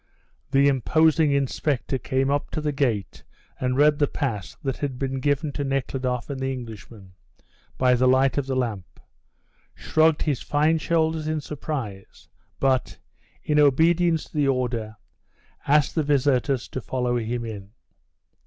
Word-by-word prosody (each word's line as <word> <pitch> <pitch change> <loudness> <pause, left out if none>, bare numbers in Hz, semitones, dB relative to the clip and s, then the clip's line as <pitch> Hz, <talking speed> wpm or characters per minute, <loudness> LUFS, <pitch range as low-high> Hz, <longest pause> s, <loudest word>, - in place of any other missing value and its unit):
The 140 +1 +4
imposing 155 +3 +3
inspector 140 -1 -1
came 135 +3 0
up 145 0 -1
to - - -1
the 150 -1 -1
gate 120 -8 -2 0.4
and 125 0 -1
read 150 +1 +4
the 145 - +3
pass 105 - -4
that 135 -2 -2
had 140 -3 -3
been 135 0 -2
given 145 +2 0
to 145 - -3
Nekhludoff 130 -2 -2
and 140 -2 -5
the 135 0 -1
Englishman 110 -5 -9 0.6
by 125 -1 +4
the 125 +1 +3
light 130 +1 +3
of 140 - -4
the 135 - -1
lamp, 110 -9 -3 0.8
shrugged 160 0 +2
his 145 -5 -1
fine 155 +2 +1
shoulders 160 -1 0
in 155 0 -1
surprise, 135 -10 -6 0.3
but, 130 -3 +1 0.5
in 150 -1 +2
obedience 160 +3 +3
to - - -17
the 145 -2 +2
order, 120 -5 -1 0.7
asked 145 +1 +3
the 160 - +1
visitors 140 -3 +1
to 130 - -5
follow 125 0 -1
him 115 +1 -3
in. 100 -3 -7
135 Hz, 150 wpm, -24 LUFS, 125-150 Hz, 0.8 s, The